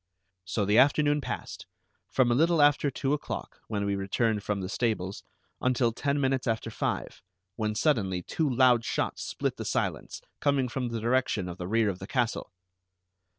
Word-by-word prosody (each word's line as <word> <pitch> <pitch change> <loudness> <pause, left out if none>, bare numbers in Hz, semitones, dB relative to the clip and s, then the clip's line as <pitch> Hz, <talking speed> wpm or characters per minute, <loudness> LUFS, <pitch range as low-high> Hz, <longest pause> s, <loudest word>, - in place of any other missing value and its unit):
So 100 +2 -1
the 105 +4 +4
afternoon 145 +2 +4
passed, - - -6 0.4
from 125 -2 +3
a - - +4
little 165 +5 +3
after 145 0 +4
two 135 +1 -1
o'clock, 150 - -5
when 100 -2 -2
we 100 0 0
returned 105 +2 0
from 105 0 -2
the 95 - -3
stables, 100 -3 -2 0.4
until 125 -2 +2
ten 140 +5 -1
minutes 135 -1 0
after 115 0 -1
five, - - -3 0.3
when 105 -1 -2
suddenly 100 - +1
two 155 - -1
loud 125 -2 +4
shots - - -2
split - - -3
the - - -4
silence, - - -2 0.2
coming 140 -3 +1
from 125 0 -2
the 115 -1 -3
direction 115 -4 +1
of 90 0 -7
the 90 - -4
rear 110 +2 +2
of 95 -2 -2
the 95 - -7
castle. 120 -6 -1
120 Hz, 175 wpm, -28 LUFS, 105-135 Hz, 0.4 s, the